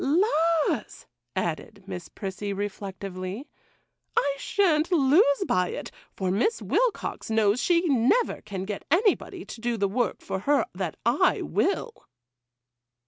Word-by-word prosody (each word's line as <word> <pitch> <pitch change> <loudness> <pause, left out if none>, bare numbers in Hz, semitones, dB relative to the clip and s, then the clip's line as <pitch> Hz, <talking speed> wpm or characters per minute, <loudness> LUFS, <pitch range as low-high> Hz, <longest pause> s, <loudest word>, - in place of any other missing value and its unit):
'—'Laws,' 330 - +1 0.3
added - - -3
Miss - - -7
Prissy, 200 0 -5
reflectively, 195 - -5 0.7
'I 280 -1 +2
sha'n't 340 -4 +2
lose 285 +1 +4
by 180 0 +2
it, - - -6 0.3
for 185 -2 0
Miss 240 - +1
Wilcox - - -1
knows 220 +1 +3
she 345 0 +2
never 280 - +2
can 190 -2 -5
get 205 0 -5
anybody 375 +1 +1
to 225 - -9
do 240 0 -1
the 200 -1 +1
work 230 +1 -1
for 190 - -3
her 285 +8 +2
that - - -4
I - - +3
will. 455 +4 0
260 Hz, 130 wpm, -26 LUFS, 200-340 Hz, 0.7 s, lose